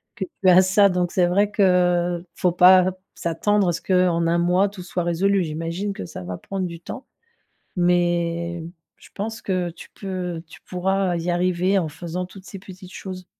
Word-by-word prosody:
que 205 -5 -3 0.2
tu - - +4
as 180 +1 +8
ça. 195 +2 +4
Donc 180 -1 0
c'est 180 - +3
vrai 200 +4 +2
que, 180 -3 +2
faut 180 - +1
pas 185 +1 +6 0.2
s'attendre 190 +4 +1
à - - +1
ce 165 - -5
qu'en 180 -2 +2
1 170 +1 +2
mois 180 +3 +2
tout 195 -2 -10
soit 180 0 -3
résolu. 185 +3 +1
J'imagine 165 +5 -3
que 140 - -7
ça 90 - -8
va 90 0 -5
prendre 195 -2 -4
du 170 -1 -9
temps. 255 +8 -8 0.7
Mais, 170 -1 0 0.4
je - - -17
pense 220 +3 -4
que 180 -2 -1
tu 165 - -13
peux 180 -4 -4
tu - - -14
pourras 190 0 0
y 170 +2 -2
arriver 180 +2 +1
en 170 -4 -1
faisant 175 +4 -5
toutes 190 +1 -14
ces 195 - -8
petites 185 -1 -12
choses. 185 -1 -8
180 Hz, 190 wpm, -22 LUFS, 175-190 Hz, 0.7 s, as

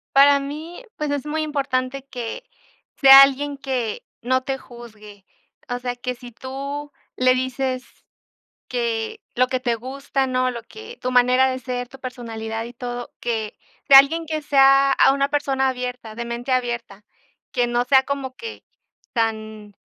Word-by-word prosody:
Para 280 0 +7
mí, 305 - -7
pues, 300 -1 -2
es 285 -1 -2
muy 310 +1 -2
importante 275 -2 -2
que 250 - -6 0.5
sea 270 0 +10
alguien 280 +1 +2
que 255 -6 -3 0.2
no 260 +2 +1
te 270 0 -2
juzgue, 215 -6 -14 0.4
o 245 0 -2
sea, 245 0 -3
que 250 +1 -4
si 245 0 -12
tú 275 +4 -6 0.2
le 255 0 +3
dices 255 0 -2 0.8
que 230 -2 -2
lo 255 +1 +2
que 255 0 -1
te 240 -2 0
gusta, 270 +2 -3
¿no? 255 0 +1
Lo 235 -1 -6
que 440 +2 -11
tu 255 - -2
manera 250 +1 +4
de 255 - -2
ser, 250 -1 -4
tu 270 +2 -14
personalidad 225 -3 -5
y 240 - -10
todo, 245 0 -6
que 220 -3 -3 0.3
sea 275 - +10
alguien 320 +5 +5
que 310 -1 -2
sea 275 -1 +5
a 270 - +5
una 275 0 0
persona 275 -2 0
abierta, 250 -3 -5
de 235 +1 -5
mente 235 +2 -4
abierta, 240 -5 -2 0.5
que 245 -1 +1
no 240 0 0
sea 265 +1 +5
como 270 -2 -4
que 455 - -8 0.5
tan 220 -2 -2
255 Hz, 165 wpm, -22 LUFS, 240-275 Hz, 0.8 s, sea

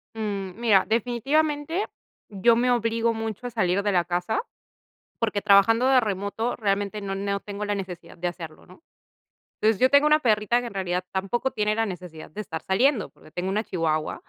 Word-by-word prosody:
Mm, 200 -3 -4
mira, 210 -5 +4
definitivamente 290 - 0 0.4
yo 210 +3 +3
me 245 +2 +2
obligo 230 -1 +1
mucho, 225 +1 -4
a - - -4
salir 200 -5 +1
de 205 - +1
la 175 -3 +3
casa, 180 - -1 0.8
porque, 215 -3 0
trabajando 210 +4 +5
de 265 -1 +6
remoto 210 +2 -2
realmente, 205 -1 -1
no 195 -1 -4
no 200 0 -2
tengo 205 +1 -6
la 205 0 -1
necesidad 180 -4 -7
de 175 +1 -1
hacerlo, 165 -3 -9
¿no? 185 - -17 0.8
Entonces, 215 -1 +2
yo 255 - +6
tengo 285 +1 +5
una 305 0 +5
perrita 220 -2 +2
que 245 - -5
en 230 - -9
realidad 180 -2 -2
tampoco 195 +7 -1
tiene 210 0 0
la 225 0 +1
necesidad 180 -5 -8
de 210 - -6
estar 165 -5 -6
saliendo, 235 +4 +2
porque 155 - -19
tengo 180 +3 -3
una 210 +3 0
chihuahua, 160 -6 -2
210 Hz, 185 wpm, -25 LUFS, 190-235 Hz, 0.8 s, de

